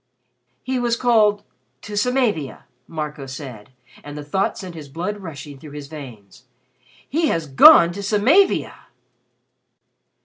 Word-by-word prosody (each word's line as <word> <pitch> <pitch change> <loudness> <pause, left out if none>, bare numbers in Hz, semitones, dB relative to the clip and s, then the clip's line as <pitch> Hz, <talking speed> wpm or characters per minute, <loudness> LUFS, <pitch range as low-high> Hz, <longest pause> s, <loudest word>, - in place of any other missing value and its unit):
"He 260 0 -2
was 240 -1 0
called 215 -4 +2 0.4
to 210 - -7
Samavia," 210 - -1 0.2
Marco 150 -3 -6
said, 130 -6 -9 0.3
and 145 0 -9
the 150 - -6
thought 190 +7 -1
sent 185 -2 -8
his 155 -4 -10
blood 180 +8 -4
rushing 145 -6 -9
through 145 +1 -12
his 145 -1 -9
veins. 125 -11 -12 0.6
"He 320 +3 0
has 165 - -1
gone 155 +4 +7
to 200 +3 -7
Samavia!" 225 - +2
165 Hz, 130 wpm, -21 LUFS, 145-210 Hz, 0.6 s, gone